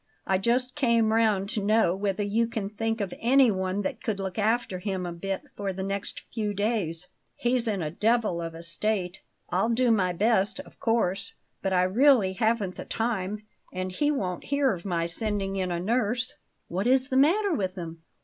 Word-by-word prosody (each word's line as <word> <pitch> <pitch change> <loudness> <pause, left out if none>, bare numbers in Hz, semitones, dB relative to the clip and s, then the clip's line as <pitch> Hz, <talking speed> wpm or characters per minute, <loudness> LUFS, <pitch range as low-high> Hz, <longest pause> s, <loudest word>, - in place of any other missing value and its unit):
I 190 -1 +2
just 250 +5 +1
came 235 -6 +2
round 215 -4 +2
to 220 -2 -2
know 210 -4 +3
whether 200 +1 -1
you 220 +3 +1
can 210 -3 -4
think 225 +1 -2
of 195 -3 -3
anyone 205 -7 +3
that - - -3
could 215 -4 -2
look 190 0 -3
after 220 -3 +1
him 190 -1 -3
a 175 - -4
bit 195 - -4
for 200 -1 -2
the 190 +1 -4
next 195 +1 -4
few 210 -3 -2
days. 190 -5 -1 0.3
He's 240 -1 +1
in 200 -5 0
a 150 - -3
devil 215 -2 +1
of 165 -1 -5
a 165 - -9
state. 180 +2 -2 0.3
I'll 195 +6 +2
do 240 +1 +3
my 190 -5 +2
best, 210 +5 +1
of - - -18
course; 200 -4 0 0.3
but 195 - -1
I 180 -1 +3
really 215 0 +4
haven't 220 -3 0
the - - -6
time; 215 -2 -2 0.3
and 185 0 -3
he 290 +11 +1
won't 190 -12 -2
hear 280 -3 +2
of 175 0 -8
my 170 -3 0
sending 195 +2 -1
in 185 -1 -1
a 170 - -1
nurse." 240 +5 0 0.3
"What 190 +6 -1
is 260 +1 +4
the 260 - -1
matter 365 +8 +4
with 190 -7 -1
him?" 165 -2 -7
205 Hz, 195 wpm, -27 LUFS, 185-230 Hz, 0.3 s, really